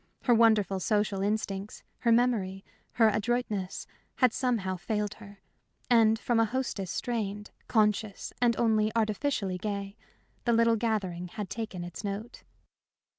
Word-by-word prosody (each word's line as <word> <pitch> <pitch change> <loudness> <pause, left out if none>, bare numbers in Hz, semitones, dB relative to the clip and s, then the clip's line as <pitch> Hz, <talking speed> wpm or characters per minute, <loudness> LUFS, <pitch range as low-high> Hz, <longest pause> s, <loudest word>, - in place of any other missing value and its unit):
Her 245 - +4
wonderful 220 -4 +4
social 205 0 0
instincts, 200 -1 -2 0.2
her 235 - +2
memory, 220 -6 +1 0.3
her 225 -2 +5
adroitness, 215 -3 -1 0.3
had 250 -3 +3
somehow 225 -8 0
failed 210 +2 -2
her. 200 -2 -13 0.5
And 225 -2 +5
from 230 +1 +1
a 225 - +5
hostess 225 -5 -3
strained, 210 -3 -3 0.2
conscious, 210 -2 +1
and 235 -1 +3
only 220 -2 +2
artificially 215 -3 0
gay, 200 0 -4 0.5
the 235 - +3
little 230 0 +4
gathering 200 -6 -1
had 195 +2 -6
taken 215 -6 -4
its 175 +4 -8
note. 205 +4 -5
215 Hz, 130 wpm, -29 LUFS, 195-230 Hz, 0.5 s, her